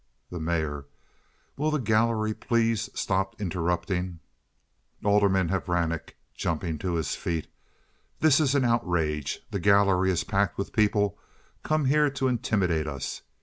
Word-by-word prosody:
The 90 - -5
Mayor. 80 -3 -2 0.7
"Will 150 +2 +1
the 155 - +1
gallery 110 -2 +1
please 115 0 0
stop 95 +1 -1
interrupting." 90 -1 -2 0.9
Alderman 100 -3 +3
Horanek 85 -3 -1 0.2
(jumping 80 -1 -2
to 90 0 -2
his 80 -3 -1
feet). 85 -3 -3 0.7
"This 155 -2 +5
is 145 -3 +2
an 135 -3 +3
outrage. 80 - 0
The 100 - -2
gallery 100 -1 +4
is 90 -3 +1
packed 100 -3 0
with 100 - -4
people 105 -2 +2 0.4
come 155 -2 0
here 150 +2 +4
to 135 -1 -1
intimidate 100 -10 0
us. 70 -3 -5
95 Hz, 130 wpm, -27 LUFS, 85-115 Hz, 0.9 s, This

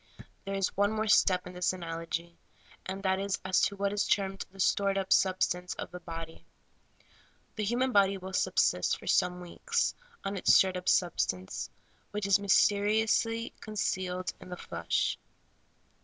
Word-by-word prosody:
There 195 0 -3
is 195 -1 -1
one 205 +2 +2
more 220 0 -1
step 185 -3 +4
in 180 - -9
this 180 +1 0
analogy, 170 -1 -5 0.5
and 190 +1 -5
that 190 -1 +1
is 200 0 -1
as 190 -1 +2
to 200 - +1
what 200 0 -1
is 205 - 0
termed 195 0 0
the 195 +1 -18
stored 195 +1 +2
up 195 0 +2
substance 180 -1 +1
of - - -7
the 180 - -7
body. 165 -1 -8 1.1
The 215 - -2
human 250 +4 +1
body 200 -2 +4
will 190 0 -8
subsist - - +2
for - - -14
some 180 0 +1
weeks 465 - -1 0.3
on 195 0 -3
its - - +5
stored 190 -1 +4
up 180 0 -1
substance, 95 - 0 0.4
which 210 -1 -3
is 200 0 +4
mysteriously 215 +3 +2
con 215 -1 -8
cealed 185 -3 -2
in - - -11
the 180 - -6
flesh. - - -1
190 Hz, 165 wpm, -30 LUFS, 180-200 Hz, 1.1 s, its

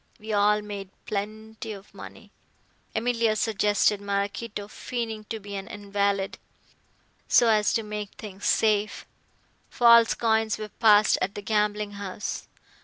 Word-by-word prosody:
We 215 0 -5
all 210 +1 +3
made 200 -2 -7 0.2
plenty 215 +2 -5
of 195 0 -13
money. - - -12 0.6
Emilia 230 -1 +1
suggested 210 -1 +2
Maraquito 200 +1 -3
feigning 225 -1 -5
to 225 +1 -5
be 205 0 -9
an 195 0 -5
invalid, 200 -2 -1 0.9
so 235 - +5
as 215 -1 +3
to 225 - 0
make 210 -1 -5
things 200 -3 -6
safe. 215 -1 +1 0.6
False 235 -2 +6
coins 220 -1 +1
were 215 0 -6
passed 215 -2 +4
at 195 +2 -1
the 205 - -6
gambling 210 0 0
house. 200 -1 -5
210 Hz, 130 wpm, -26 LUFS, 205-220 Hz, 0.9 s, False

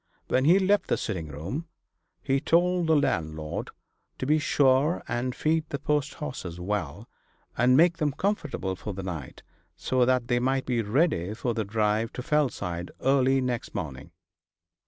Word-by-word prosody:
When 130 +1 +2
he 175 +5 +6
left 200 +1 +2
the - - +1
sitting 85 -4 -3
room 85 - -5 0.6
he 135 0 +1
told 175 +2 +2
the 160 - +4
landlord 80 - -1 0.5
to - - -3
be 155 +3 +3
sure 140 +2 +2
and 120 +1 -2
feed 155 0 0
the 140 - -2
post 145 +1 -1
horses 90 - -6
well, 90 -5 -3 0.5
and 125 +2 +4
make 170 +1 +5
them 150 -4 +1
comfortable 150 - -2
for 100 +1 -6
the 95 - -5
night, 80 -8 -6 0.3
so 125 +9 +1
that 125 -1 +1
they 120 0 +2
might 130 +2 0
be 120 -2 0
ready 105 - +1
for 120 +1 -2
the 110 -1 -1
drive 110 +2 0
to 125 - -5
Fellside 115 - -1
early 135 0 +3
next 125 -2 -3
morning. 70 -4 -5
125 Hz, 160 wpm, -27 LUFS, 100-150 Hz, 0.6 s, he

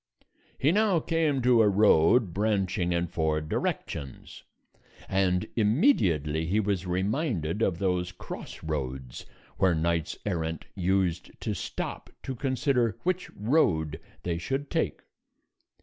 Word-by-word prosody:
He 140 +4 +3
now 205 -2 +3
came 155 -5 0
to 120 -2 +5
a 105 - +5
road 100 0 +4
branching 95 -3 0
in 85 0 +1
four 80 -2 0
directions, 70 -3 -4 0.7
and 90 -2 +1
immediately 95 - +2
he 100 +5 +2
was 100 -3 -1
reminded 95 - -1
of 90 -6 +1
those 90 -1 0
cross 90 - -9
roads 65 -5 -4 0.3
where 95 -3 +3
knights 85 0 -1
errant 80 -5 -2
used 90 -2 0
to - - -2
stop - - -5
to 135 - -4
consider 130 -3 0
which 185 0 -1
road 95 - +1 0.2
they 85 -1 -2
should 135 +9 -3
take. - - -1
95 Hz, 120 wpm, -28 LUFS, 85-120 Hz, 0.7 s, to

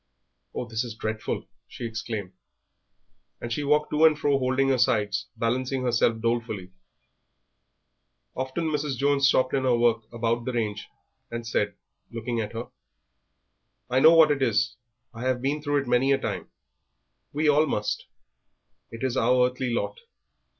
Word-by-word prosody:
Oh, - - -2
this 115 0 -2
is 115 -3 -7
dreadful!" 110 0 -3 0.2
she - - -7
exclaimed, 110 -4 -5 1.1
and 120 0 -4
she 145 - -2
walked 150 +1 +2
to 150 +1 +2
and 155 -2 +6
fro 145 -2 +2
holding 130 +1 +1
her 130 -2 +2
sides, 110 -5 +1
balancing 130 +3 -1
herself 115 -2 +2
dolefully. 115 -5 -2 1.6
Often 130 +5 -2
Mrs. 145 -3 -2
Jones 140 0 +3
stopped 130 -1 +2
in 135 - +2
her 125 -2 +3
work 115 -2 +1
about 115 0 -1
the 130 - -2
range 105 -3 -2 0.4
and 115 0 -5
said, 105 -3 -1 0.3
looking 115 0 -3
at 105 0 -5
her, 115 +2 -5 1.2
"I 130 - +4
know 160 +5 +8
what 160 -2 +7
it 140 -2 0
is, 125 -1 +1 0.4
I 115 - -9
have 130 -1 +1
been 140 +4 -1
through 145 -1 0
it - - -13
many 125 +3 +3
a 135 - +4
time - - -4 0.8
we 150 +2 0
all 150 +1 +4
must 105 -6 -2 0.8
it 115 +2 -8
is 130 -1 0
our 125 0 +3
earthly 125 -1 -3
lot." 120 - -2
125 Hz, 155 wpm, -26 LUFS, 115-135 Hz, 1.6 s, know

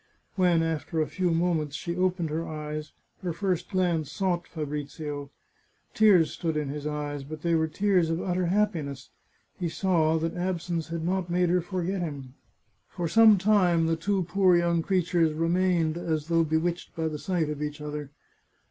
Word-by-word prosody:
When, 175 -3 +3
after 165 0 -2
a 155 - +2
few 180 +3 -1
moments, 165 -3 0
she 170 0 -4
opened 180 -3 0
her 165 +2 -2
eyes, 150 0 -5 0.3
her 180 - -2
first 180 -1 -1
glance 175 -6 0
sought 180 -1 -1
Fabrizio. 150 -1 -5 0.6
Tears 200 -7 +5
stood 165 -3 -2
in 150 -2 -2
his 145 +1 -4
eyes, 145 -1 -3
but 155 +2 -8
they 170 -1 +1
were 160 -1 +2
tears 180 0 +2
of 165 +1 -1
utter 180 -1 -1
happiness. 170 -9 -1 0.5
He 175 -2 -1
saw 160 -3 +2
that 165 +1 -2
absence 175 -2 -2
had 165 -1 -4
not 185 0 -1
made 175 0 +2
her 180 +1 +3
forget 185 +1 -2
him. 140 -6 -5 0.6
For 175 -2 -3
some 220 +4 +7
time 180 -4 +3
the 165 0 +1
two 190 +3 0
poor 180 0 +3
young 170 -1 +2
creatures 170 -3 +1
remained 165 0 +1
as 160 -2 -2
though 165 0 +4
bewitched 165 +3 -1
by 160 -1 -1
the 155 -1 -4
sight 170 -4 -1
of 150 -1 -5
each 150 0 -4
other. 150 -1 -5
165 Hz, 175 wpm, -27 LUFS, 155-180 Hz, 0.6 s, some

